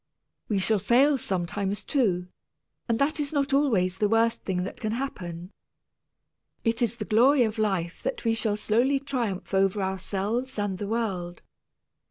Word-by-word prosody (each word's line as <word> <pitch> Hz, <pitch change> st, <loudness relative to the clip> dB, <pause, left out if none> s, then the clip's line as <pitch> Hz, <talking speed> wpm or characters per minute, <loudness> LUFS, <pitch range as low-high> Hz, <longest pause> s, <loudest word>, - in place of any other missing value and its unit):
We 210 Hz, -, +1 dB
shall 205 Hz, +2 st, +2 dB
fail 255 Hz, +9 st, +4 dB
sometimes, 195 Hz, +1 st, -2 dB
too, 195 Hz, -, +1 dB, 0.6 s
and 230 Hz, -, +2 dB
that 280 Hz, +5 st, +1 dB
is 290 Hz, -1 st, -1 dB
not 280 Hz, -2 st, 0 dB
always 195 Hz, -10 st, +2 dB
the 210 Hz, -, +2 dB
worst 230 Hz, +1 st, +2 dB
thing 180 Hz, -2 st, -2 dB
that 200 Hz, +6 st, -6 dB
can 215 Hz, -2 st, -1 dB
happen. 180 Hz, -9 st, -5 dB, 1.1 s
It 230 Hz, 0 st, 0 dB
is 235 Hz, -1 st, +1 dB
the 220 Hz, -3 st, -5 dB
glory 245 Hz, +5 st, +5 dB
of 220 Hz, 0 st, -2 dB
life 190 Hz, -5 st, -1 dB
that -, -, -4 dB
we 225 Hz, -, +3 dB
shall 220 Hz, -2 st, 0 dB
slowly 245 Hz, +6 st, +2 dB
triumph 240 Hz, -10 st, -3 dB
over 195 Hz, +1 st, +2 dB
ourselves 200 Hz, +6 st, -2 dB
and 205 Hz, -3 st, -2 dB
the 205 Hz, -, -3 dB
world. 190 Hz, -6 st, -3 dB
215 Hz, 160 wpm, -26 LUFS, 190-245 Hz, 1.1 s, glory